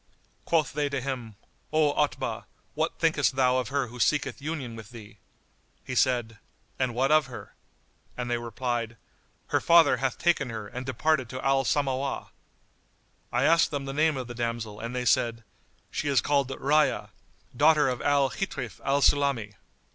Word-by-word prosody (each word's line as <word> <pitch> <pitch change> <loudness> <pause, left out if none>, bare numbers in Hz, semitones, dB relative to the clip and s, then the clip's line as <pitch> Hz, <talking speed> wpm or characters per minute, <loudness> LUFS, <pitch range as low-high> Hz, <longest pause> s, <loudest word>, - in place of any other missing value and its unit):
Quoth 155 -5 +1
they 145 0 0
to 140 -1 -2
him, 125 -5 -5 0.4
"O 155 -2 +3
Otbah, 150 0 -1 0.3
what - - -2
thinkest 130 - +2
thou 130 -1 +3
of 125 -3 -1
her 140 +1 0
who 125 +1 -11
seeketh 145 +2 +1
union 140 -6 -4
with 110 -1 -10
thee?" 105 -4 -13 0.6
He 130 - -6
said, 120 -4 +1 0.4
"And 130 -3 0
what 135 +4 +2
of 155 -3 +4
her?"; 125 - -10 0.6
and 125 -1 -3
they 120 -1 -1
replied, 120 0 -3 0.5
"Her - - +1
father 165 -6 +5
hath 130 0 -1
taken 170 -7 +1
her 110 -2 -6
and 125 +4 -7
departed 130 -1 0
to 130 0 -6
Al 135 0 +2
Samawah."[FN#85] 135 -1 -1 1.0
I 120 +2 +1
asked 165 +3 +4
them 140 -2 -4
the 135 - -5
name 155 0 +2
of 130 - -4
the 120 - -8
damsel 115 -3 -4
and 115 +3 -5
they 125 0 -2
said, 115 -1 +1 0.5
"She - - -3
is 140 -3 +3
called 140 +3 +1
Rayyá, 150 +3 +1 0.5
daughter 150 +1 +5
of 125 -2 -2
Al 140 -2 +2
Ghitríf 130 - -5
al 140 +1 +1
Sulami." 140 -8 +2
130 Hz, 170 wpm, -27 LUFS, 120-145 Hz, 1.0 s, father